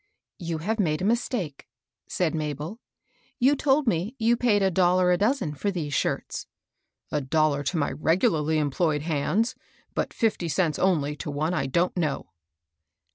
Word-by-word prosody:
" - - -65
You 165 - -1
have 215 +8 -2
made 155 -3 +1
a - - +1
mistake," 215 - -1 0.4
said 175 -3 0
MabeL 155 - -4 0.6
You 275 +3 +4
told 280 +1 +2
me 200 +3 0
you 230 0 +3
paid 225 -4 +2
a 190 - +3
dollar 180 0 +3
a 180 - +3
dozen 210 - +1
for 200 +8 -2
these 160 -7 -3
shirts." - - -2 0.3
" - - -47
A 150 - 0
dollar 150 +1 +1
to 165 - -1
my 145 - 0
regularly 160 -2 +1
employed 150 0 0
hands, 175 - 0 0.4
but - - -1
fifty 220 -7 0
cents 160 0 0
only 150 -6 +1
to - - -5
one 155 +4 -1
I 135 -6 0
don't 170 +7 +1
know." 155 -6 -2
170 Hz, 170 wpm, -26 LUFS, 150-205 Hz, 0.6 s, You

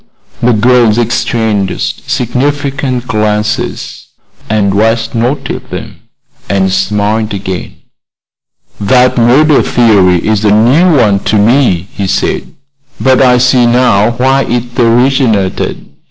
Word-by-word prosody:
The 120 +1 +2
girls 120 0 +2
exchanged 110 -4 -2
significant 135 0 -2
glances, 105 -2 -3 0.4
and 100 -2 0
West 115 +2 0
noted 120 +5 -3
them - - -8 0.5
and 95 -1 0
smiled 105 +2 -1
again. 95 -2 -6 1.0
"That 125 +4 +2
murder 140 +6 +3
theory 100 -7 +2
is 110 -1 0
a 105 - +3
new 130 - +3
one 105 -5 +2
to - - 0
me," 105 -4 +1
he 100 -1 -4
said; - - -2 0.5
"but 130 -1 +2
I 125 -2 +4
see 125 -1 +2
now 120 -4 +2
why 135 +2 +1
it 120 +1 -4
originated. 120 -4 0
115 Hz, 110 wpm, -10 LUFS, 105-125 Hz, 1.0 s, I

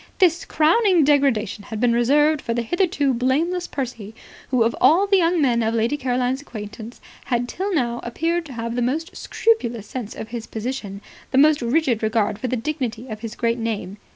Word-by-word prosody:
This 345 -3 +3
crowning 345 +2 +3
degradation 265 -8 +1
had 220 - -6
been 240 0 +3
reserved 295 +6 +3
for 230 - -2
the 240 - 0
hitherto 295 - +1
blameless 310 +9 0
Percy, 230 -6 -5 0.3
who, 255 -3 +3
of 230 +1 0
all 325 +10 +5
the 400 -1 +3
young 345 -1 +2
men 245 -5 +2
of 225 0 0
Lady 230 +5 +1
Caroline's 255 -1 -1
acquaintance, 220 -2 -9 0.3
had 245 -2 0
till 385 +9 -3
now 240 -8 0
appeared 330 +8 -1
to 270 - -9
have 230 0 -4
the 245 - 0
most 295 +8 -2
scrupulous 240 - 0
sense 225 -1 -6
of 220 - -7
his 230 -1 -6
position, 220 -4 -5 0.3
the 260 - -1
most 300 +1 +5
rigid 245 -1 +1
regard 220 -2 0
for 255 - -2
the 255 - -1
dignity 250 -2 -4
of 215 -1 -6
his 230 0 -7
great 235 0 0
name. 210 -4 -3
250 Hz, 190 wpm, -22 LUFS, 230-305 Hz, 0.3 s, all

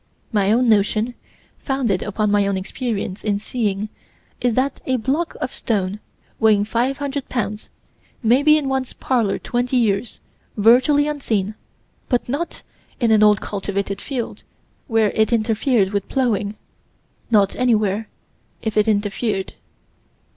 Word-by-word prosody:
My 205 -3 +2
own 245 +3 +3
notion, 215 +2 +2 0.5
founded 250 -9 0
upon 210 0 -1
my 205 -1 +3
own 200 -1 0
experience 200 -1 -4
in 205 -2 +1
seeing, 210 -1 -2 0.5
is 245 -2 +1
that 270 +2 0
a 260 - +2
block 270 +8 -1
of - - -3
stone 205 -3 -1 0.4
weighing 210 -2 +4
500 270 +5 -2
pounds 210 -3 -3 0.5
might 245 +6 +4
be 305 0 +7
in 295 -3 -2
one's 265 -1 -1
parlor 230 -7 0
twenty 245 +1 -1
years, 220 -1 0 0.4
virtually 255 +7 +5
unseen 220 -9 -1 0.6
but 245 -2 +1
not 290 +7 -3 0.4
in 235 -3 +2
an 215 -1 +5
old 210 -1 +5
cultivated 200 0 -3
field, 250 -5 -4 0.5
where 225 -4 +2
it 220 +1 +1
interfered 225 -2 +2
with 200 -2 -2
plowing 215 -6 0 0.7
not 205 -4 +3
anywhere 215 -4 +1 0.5
if 220 -2 -2
it 210 - +4
interfered. 205 -1 -1
220 Hz, 135 wpm, -21 LUFS, 205-255 Hz, 0.7 s, be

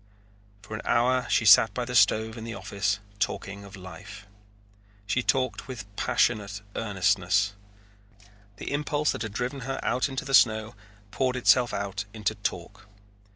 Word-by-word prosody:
For - - -10
an 110 - -4
hour 125 +1 +2
she 110 - +2
sat 105 0 +7
by 125 - -2
the 125 - -6
stove 110 0 +3
in 115 - -8
the 115 0 -6
office 100 0 -1 0.2
talking 100 0 -3
of 100 0 -11
life. 100 +3 -11 0.8
She 115 +5 0
talked 130 0 0
with 105 -6 -9
passionate 105 -3 0
earnestness. 100 -1 +1 1.0
The - - -6
impulse 150 +1 0
that - - -5
had 110 -3 -4
driven 125 +4 -3
her 135 +1 -4
out 125 +3 0
into 135 +3 -4
the 135 - -5
snow 110 -3 +4 0.4
poured 130 +1 0
itself 125 -1 +4
out 100 0 -3
into 110 0 -1
talk. 100 0 -5
110 Hz, 155 wpm, -27 LUFS, 100-125 Hz, 1.0 s, sat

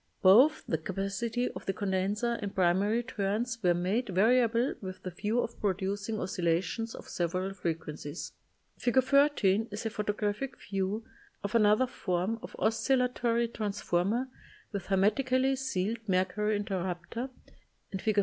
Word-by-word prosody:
Both 250 +12 +7
the 160 - 0
capacity 200 +7 -2
of - - -9
the 195 - +1
condenser 205 +4 0
and 200 -2 -4
primary 195 +6 +2
turns 230 +1 -2
were 175 -3 +3
made 200 +7 0
variable 235 +5 +3
with 185 -2 -7
the 185 - -4
view 210 +6 -1
of 230 - -3
producing 200 +2 -1
oscillations 180 +5 -1
of - - -10
several 185 +3 -2
frequencies. 160 -3 -4 0.5
Fig. 255 +1 +3
13 260 -7 +3
is 210 +2 -6
a 225 - -1
photographic 210 +5 -2
view 195 +2 -2 0.4
of 200 - -3
another 215 +2 +5
form 195 -1 -2
of - - -9
oscillatory 240 0 +1
transformer 210 +1 -1 0.4
with 200 -3 -4
her 195 - +2
metically 260 +6 +2
sealed 230 -4 -1
mercury 190 +3 +1
interrupter, 190 +4 -3 0.6
and 190 - -4
Fig. 215 -1 0
205 Hz, 135 wpm, -30 LUFS, 190-235 Hz, 0.6 s, Both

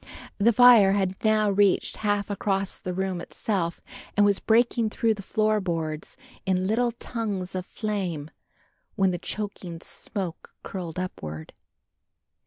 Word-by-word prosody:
The 225 +4 +5
fire 230 -4 +7
had 190 -2 -1
now 215 -1 +3
reached 200 -1 +2
half 205 -1 0
across 195 -1 -1
the 185 - -3
room 185 -1 -2
itself 175 -5 -2 0.4
and 205 - +6
was 200 -1 +3
breaking 230 0 +3
through 225 +1 +1
the 205 - -8
floor 215 +1 +1
boards 160 -4 -3 0.3
in 185 -1 +1
little 235 +4 +1
tongues 210 -6 -4
of 185 -1 -4
flame, 185 -9 -3 0.6
when 190 -2 +3
the 175 - -3
choking 190 -4 -5
smoke 190 -6 -6
curled 175 -4 -6
upward. 80 - -5
195 Hz, 135 wpm, -26 LUFS, 180-215 Hz, 0.6 s, fire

